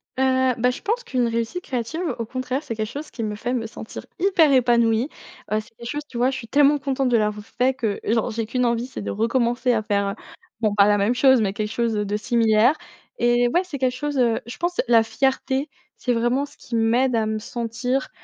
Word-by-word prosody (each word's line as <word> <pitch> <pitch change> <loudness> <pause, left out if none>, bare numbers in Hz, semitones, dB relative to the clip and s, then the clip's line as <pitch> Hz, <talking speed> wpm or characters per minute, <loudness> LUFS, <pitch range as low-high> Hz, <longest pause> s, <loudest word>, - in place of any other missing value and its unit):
Heu, 260 -1 +2
ben, 250 +1 +4
je 250 - -8
pense 470 +4 -1
qu'une 255 - 0
réussite 230 +10 -2
créative 255 +6 -3 0.2
au 230 - -3
contraire, 255 +4 -3
c'est 230 - -5
quelque 215 -1 -3
chose 290 +5 -7
qui 230 - -5
me 210 -1 -2
fait 245 +4 -3
me 230 -3 -2
sentir 220 - -9
hyper 340 -5 +4
épanouie. 235 -1 +3 0.4
Heu, 215 - +2
c'est 220 +1 -13
des 235 - -9
choses, 290 +5 -3
tu 245 - -8
vois, 250 +2 +2
je 265 - -4
suis 230 - -8
tellement 290 +3 +4
contente 270 -1 0
de 240 - +4
l'avoir 210 -1 -1
fait 250 +3 0
que, 225 -6 -2
genre, 230 +2 0
j'ai 225 0 -2
qu'une 250 +2 0
envie, 235 +1 0
c'est 260 - -7
de - - -3
recommencer 240 +3 +1
à 220 -2 0
faire, 200 -1 0
heu, 200 - -4 0.5
bon 215 -2 +2
pas 200 -1 +6
la 205 0 +4
même 205 +4 +2
chose 260 0 +5
mais 195 -2 0
quelque 210 +1 -3
chose 230 0 0
de 210 -1 -1
similaire. 225 +3 +3 0.4
Et 240 0 +3
ouais, 350 - +4
c'est 360 -6 -6
quelque 255 -1 +1
chose, 290 +1 -3
heu, 235 -3 +2
je 235 - -8
pense 355 +1 0
la 230 -1 +5
fierté 265 +3 0 0.3
c'est 250 - 0
vraiment 240 +4 +1
ce - - -19
qui 235 - -6
m'aide 235 +3 +2
à 225 -1 +1
me 215 0 -2
sentir, 240 +4 -3
240 Hz, 235 wpm, -23 LUFS, 225-265 Hz, 0.5 s, pas